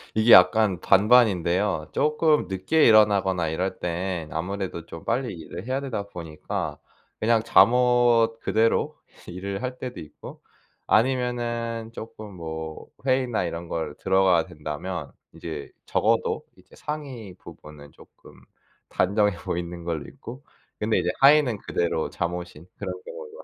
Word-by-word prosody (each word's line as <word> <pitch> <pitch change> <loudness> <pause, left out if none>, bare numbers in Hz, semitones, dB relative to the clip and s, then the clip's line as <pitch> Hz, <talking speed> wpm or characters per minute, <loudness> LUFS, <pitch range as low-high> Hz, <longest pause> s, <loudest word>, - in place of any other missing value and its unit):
이게 110 +2 +4
약간 95 +1 +6
반반인데요. 95 -6 +3
쪼끔 150 - +2
늦게 95 - +1
일어나거나 100 -5 +4
이럴 95 +4 -3
때엔 85 -2 -3
아무래도 90 0 -4
좀 80 -1 -10
빨리 125 -4 -1
일을 85 +3 -8
해야 130 +2 -1
되다 120 -7 -3
보니까 80 -5 -5 0.4
그냥 115 0 +3
잠옷 120 -1 +4
그대로 115 +1 +1 0.3
일을 95 +4 -5
할 125 0 -4
때도 125 -1 -6
있고 75 - -12 0.4
아니면은 120 -1 0
쪼끔 110 -3 -9
뭐 80 -2 -7 0.2
회의나 130 -7 +1
이런 85 0 -5
걸 80 -3 -3
들어가야 95 -3 +3
된다면 75 +2 -6 0.2
이제 80 -4 -7
적어도 - - +1
이제 - - -20
상의 135 -10 -6
부분은 75 -3 -13
쪼끔 - - -18 0.6
단정해 100 +1 +1
보이는 85 0 -5
걸로 80 -4 -3
입고 130 +4 -11 0.4
근데 110 +1 +1
이제 - - -1
하의는 140 -4 +5
그대로 80 -5 -1
잠옷인 85 -1 -5
그런 - - -4
경우가 480 -1 -10
100 Hz, 290 characters per minute, -25 LUFS, 85-120 Hz, 0.6 s, 약간